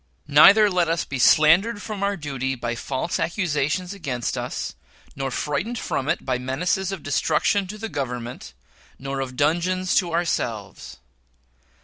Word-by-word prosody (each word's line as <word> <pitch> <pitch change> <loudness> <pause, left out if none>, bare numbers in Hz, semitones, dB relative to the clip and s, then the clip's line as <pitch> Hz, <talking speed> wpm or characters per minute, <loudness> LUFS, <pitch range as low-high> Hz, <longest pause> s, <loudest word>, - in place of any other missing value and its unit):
Neither 200 +9 +7
let 180 -3 +1
us 165 0 0
be 130 - -5
slandered 175 - +5
from 210 -1 -6
our 200 0 0
duty 135 -4 -3
by 120 -1 -3
false 130 +6 -3
accusations 170 +1 -1
against 135 - -3
us, - - -4 0.4
nor 135 0 -3
frightened 150 - -2
from 135 -8 -2
it - - -1
by 130 -2 -1
menaces 175 +9 -1
of 195 -5 -6
destruction 160 +7 +1
to 210 +3 -7
the 225 +1 -5
Government 125 - -5 0.4
nor 135 0 -4
of 130 -1 -4
dungeons 175 +6 +1
to 175 -3 +1
ourselves. 125 - -3
155 Hz, 145 wpm, -23 LUFS, 135-185 Hz, 0.4 s, Neither